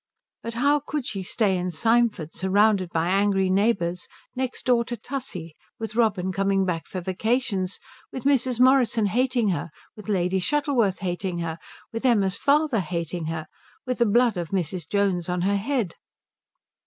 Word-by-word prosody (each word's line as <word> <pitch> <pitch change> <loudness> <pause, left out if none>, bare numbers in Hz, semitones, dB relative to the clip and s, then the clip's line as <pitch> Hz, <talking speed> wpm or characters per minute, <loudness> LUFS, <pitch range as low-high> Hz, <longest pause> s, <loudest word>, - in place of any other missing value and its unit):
But 230 0 -6
how 285 +5 +3
could 295 -1 -4
she 195 -5 -3
stay 195 +1 +1
in 180 0 -2
Symford, 225 -4 +1
surrounded 195 0 +2
by 165 +1 0
angry 195 -1 +2
neighbours, 185 -4 +1 0.3
next 255 0 -3
door 245 -2 +3
to 240 0 -5
Tussie, 225 - -6 0.2
with 225 -1 -6
Robin 205 -6 +1
coming 195 0 +1
back 170 -3 -2
for 185 - -5
vacations, 195 0 -1 0.3
with 260 - -6
Mrs. 260 -3 +2
Morrison 250 -4 +4
hating 245 +1 +1
her, 170 -2 -2 0.3
with 215 0 -10
Lady 190 -1 +1
Shuttleworth 245 -5 +1
hating 180 -1 -2
her, 165 -1 -4 0.3
with 225 - -4
Emma's 205 -7 +3
father 290 -3 +2
hating 170 -1 -3
her, 160 0 -4 0.4
with 255 -1 -2
the 235 - +4
blood 235 -1 +3
of 170 -2 -3
Mrs. 180 -3 -3
Jones 195 -4 0
on 180 0 -1
her 200 +2 +2
head? 225 - -1
200 Hz, 160 wpm, -25 LUFS, 180-240 Hz, 0.4 s, Morrison